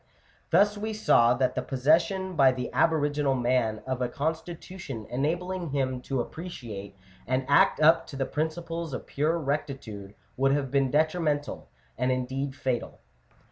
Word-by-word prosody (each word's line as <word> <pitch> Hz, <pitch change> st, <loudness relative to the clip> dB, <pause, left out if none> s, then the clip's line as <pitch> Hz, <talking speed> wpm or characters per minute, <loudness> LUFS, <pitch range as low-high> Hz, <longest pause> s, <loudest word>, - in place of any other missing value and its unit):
Thus 205 Hz, +1 st, +4 dB
we 220 Hz, +1 st, -3 dB
saw 120 Hz, -, +4 dB
that 130 Hz, +1 st, +1 dB
the -, -, -1 dB
possession 165 Hz, +8 st, +1 dB
by 135 Hz, -3 st, +5 dB
the 125 Hz, -1 st, -4 dB
aboriginal 145 Hz, -3 st, +2 dB
man 120 Hz, -3 st, 0 dB
of 130 Hz, -1 st, -3 dB
a 125 Hz, -, 0 dB
constitution 160 Hz, -, -5 dB
enabling 175 Hz, +6 st, -1 dB
him 130 Hz, -2 st, -1 dB
to 135 Hz, -2 st, 0 dB
appreciate 120 Hz, -, -7 dB, 0.3 s
and 130 Hz, +1 st, 0 dB
act 140 Hz, -, +4 dB
up 160 Hz, +2 st, +5 dB
to 140 Hz, -, -9 dB
the 135 Hz, 0 st, -1 dB
principles 165 Hz, +1 st, -3 dB
of -, -, -7 dB
pure 155 Hz, +4 st, 0 dB
rectitude 135 Hz, -9 st, -4 dB, 0.2 s
would 135 Hz, +1 st, +3 dB
have 140 Hz, -3 st, -1 dB
been 135 Hz, -1 st, +2 dB
detrimental, 155 Hz, 0 st, 0 dB, 0.3 s
and 125 Hz, +1 st, +2 dB
indeed 130 Hz, +2 st, -2 dB
fatal 130 Hz, -3 st, -3 dB, 0.3 s
(p. -, -, -32 dB
140 Hz, 150 wpm, -27 LUFS, 130-160 Hz, 0.3 s, by